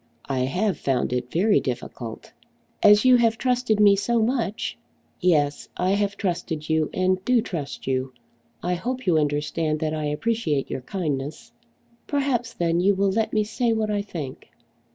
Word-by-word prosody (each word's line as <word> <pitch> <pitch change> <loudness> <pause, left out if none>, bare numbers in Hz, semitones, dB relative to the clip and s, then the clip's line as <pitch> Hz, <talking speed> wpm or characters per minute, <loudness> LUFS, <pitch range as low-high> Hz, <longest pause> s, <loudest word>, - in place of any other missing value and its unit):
"I 135 -2 -2
have 185 +9 0
found 130 -2 0
it 125 0 -3
very 200 +5 +3
difficult!" 120 -3 -6 0.5
"As 210 +3 +6
you 255 -1 +7
have 230 -2 +2
trusted 250 -4 +1
me 205 -1 +7
so 230 +4 +1
much 225 -2 -1 0.2
" - - -40 0.2
"Yes; 150 -5 +1
I 185 +1 +1
have 200 0 0
trusted 170 -5 -3
you, 160 -1 +1
and 185 0 +1
do 250 +2 +3
trust 170 - -5
you. 130 0 -1 0.5
I 180 - 0
hope 255 +8 -3
you 170 -4 +4
understand 150 +1 -1
that 155 -1 -1
I 155 -1 -2
appreciate 150 -1 -1
your - - -3
kindness." 145 -3 -4 0.6
"Perhaps 260 -5 0
then 170 0 +1
you 195 +3 +3
will 195 0 +2
let 220 +2 0
me 215 - +2
say 230 +2 0
what 215 -1 0
I 205 -1 0
think." 155 -10 -7
185 Hz, 170 wpm, -24 LUFS, 150-220 Hz, 0.6 s, you